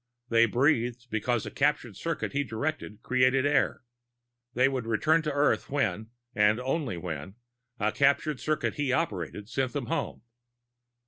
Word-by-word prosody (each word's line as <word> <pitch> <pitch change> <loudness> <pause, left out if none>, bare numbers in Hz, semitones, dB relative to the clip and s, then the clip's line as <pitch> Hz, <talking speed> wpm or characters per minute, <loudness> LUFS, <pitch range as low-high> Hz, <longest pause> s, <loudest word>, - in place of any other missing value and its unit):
They 115 0 +5
breathed 120 -1 +1
because 110 +1 0
a - - -6
captured 140 -7 0
circuit 165 - -3
he 145 +1 +1
directed 115 -2 -4
created 130 +1 +3
air. 145 -2 +1 0.7
They 125 +2 +4
would 130 -4 -2
return 155 +9 +3
to 155 -1 -2
Earth 145 +1 +1
when 110 -7 -1 0.2
and 105 +2 +3
only 130 - -2
when 85 +1 -6 0.4
a 105 +1 +1
captured 140 +1 +2
circuit 155 +4 -1
he 145 -3 0
operated 105 - -2
sent 130 0 -2
them 140 -4 -2
home. 115 - -3
125 Hz, 145 wpm, -28 LUFS, 110-145 Hz, 0.7 s, They